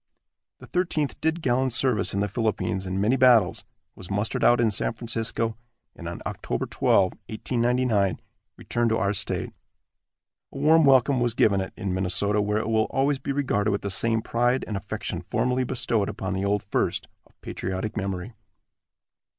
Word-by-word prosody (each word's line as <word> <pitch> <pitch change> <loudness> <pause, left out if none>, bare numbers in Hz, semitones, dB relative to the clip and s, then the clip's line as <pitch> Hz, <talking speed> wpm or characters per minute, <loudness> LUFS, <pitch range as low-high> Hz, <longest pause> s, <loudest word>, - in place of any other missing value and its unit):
The - - -13
Thirteenth 165 -5 -1
did 160 +1 0
gallant 130 0 +1
service 120 -6 +1
in 100 - -1
the 105 - +1
Philippines, 100 -3 -2
in 95 +1 -2
many 110 +7 +2
battles, 120 -7 +4 0.3
was 90 - -11
mustered 105 +2 -1
out 120 - +5
in 115 -2 +3
San 105 - -1
Francisco, 115 0 -3 0.4
and, 85 - -8
on 85 - -7
Oct. - - -6 0.3
12, 95 -2 +3 0.2
1899, 120 -3 0 0.4
returned 120 0 -1
to 110 - +1
our 100 -1 +1
state. 100 - -4 1.0
A - - -9
warm 155 +3 +5
welcome 135 0 +4
was 120 -1 0
given 100 -5 +3
it 95 - -5
in 100 -4 -3
Minnesota, 95 +3 +1
where 105 +1 0
it 110 - -2
will 110 -1 +2
always 135 +1 0
be 140 - -3
regarded 125 -7 0
with 100 -1 -1
the 100 - -2
same 110 +3 +1
pride 120 +2 +1
and 105 - -3
affection 95 - -4
formerly 125 0 +1
bestowed 120 -5 0
upon 95 +1 -4
the 95 +1 -1
old 100 0 0
First, 100 - -1 0.2
of - - -33
patriotic 95 +3 -4
memory. 100 +1 -4
110 Hz, 170 wpm, -25 LUFS, 100-125 Hz, 1.0 s, out